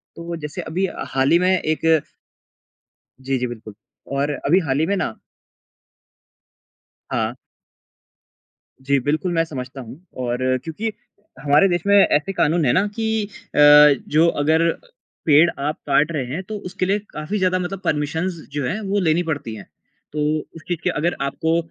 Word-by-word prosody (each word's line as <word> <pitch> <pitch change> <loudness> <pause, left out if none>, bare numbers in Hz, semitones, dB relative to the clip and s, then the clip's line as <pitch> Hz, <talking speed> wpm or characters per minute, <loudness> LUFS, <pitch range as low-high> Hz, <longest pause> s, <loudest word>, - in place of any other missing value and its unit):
तो, 170 0 -6
जैसे 150 +3 -6
अभी 175 +3 -2 0.3
हाल 135 +1 +2
ही 170 - +6
में 180 +1 +2
एक 160 -1 +1 1.2
जी, 135 0 -1
जी। 125 - -1
बिल्कुल 110 -3 -9 0.4
और 145 +2 0
अभी 170 +7 +4
हाल 135 +1 +1
ही 160 - +2
में 200 +4 0
ना 180 - -2 2.0
हाँ। 110 -1 -1 1.5
जी, 140 +1 +1
बिल्कुल 155 +7 -1
मैं 165 -1 +2
समझता 130 -3 -7
हूँ 125 +4 -11 0.2
और 120 0 -1 0.3
क्योंकि 205 +9 -4 0.5
हमारे 145 +6 +4
देश 175 -2 0
में 200 - +5
ऐसे 195 -2 +3
कानून 165 -2 +2
हैं 120 - +3
ना 190 - +3
कि 220 -1 0 0.3
अ, - - -4 0.5
जो 160 +3 +4
अगर 160 +3 +3 0.5
पेड़ 155 +2 +6
आप 150 +2 -1
काट 145 +3 +3
रहे 145 -5 -2
हैं 175 - -3
तो 215 +3 -6
उसके 185 - -2
लिए 200 +3 +1
काफ़ी 155 +7 -4
ज़्यादा 185 -1 +2
मतलब 180 +1 -4
परमिशन्स 160 +4 -1
जो 145 -2 -2
हैं, 185 +12 -2
वो 200 0 -1
लेनी 170 -1 +2
पड़ती 145 -8 -4
हैं। 100 - -10 0.5
तो 150 - -3 0.4
उस 165 - -10
चीज़ 175 -3 -2
के - - +1
अगर 170 +1 -1
आपको 160 +4 0
160 Hz, 165 wpm, -21 LUFS, 140-180 Hz, 2.0 s, ही